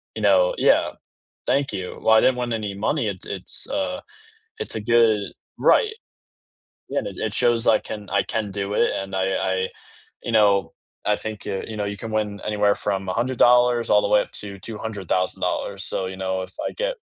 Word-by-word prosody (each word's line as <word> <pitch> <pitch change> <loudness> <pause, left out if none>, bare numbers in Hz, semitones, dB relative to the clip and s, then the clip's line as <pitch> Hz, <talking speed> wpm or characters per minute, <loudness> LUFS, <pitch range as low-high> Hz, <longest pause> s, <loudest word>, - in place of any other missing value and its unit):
you - - -4
know - - +4
yeah. - - +3 0.6
Thank 140 -2 +1
you 95 -2 -5
while 110 0 +5
I - - +6
didn't 130 -1 +3
win 120 -1 -2
any 105 -3 -3
money, 110 +4 0
it's 95 -3 -5
it's 95 -2 -4
a 280 0 -2 0.6
it's - - -2
a - - -2
good 110 -2 +3 0.3
right. 440 -3 +4 1.0
Yeah, - - 0
and - - -5
it - - -2
shows 120 -1 +2
I 110 - +5
can 105 -2 -8
I 100 - +2
can 105 -3 -3
do 100 +1 -3
it, - - +3
and 95 0 -4
I 95 0 +1
I, 95 0 0 0.6
you 120 - -3
know, 100 -3 +3 0.3
I 105 - +3
think, 110 -1 -7
uh, 95 - -2
you 110 - -6
know, 105 - -1
you 100 0 -4
can 110 +2 -6
win 105 -2 -1
anywhere 105 -1 +2
from 95 -2 -2
$100 120 +2 +3
all 105 0 +5
the - - 0
way 105 0 +5
up - - -8
to 100 -2 -8
$200,000 100 -4 -2
So, 95 - -2
you 95 0 -7
know, 95 0 -2
if 95 - -10
I - - -4
get - - -2
105 Hz, 195 wpm, -23 LUFS, 100-115 Hz, 1.0 s, I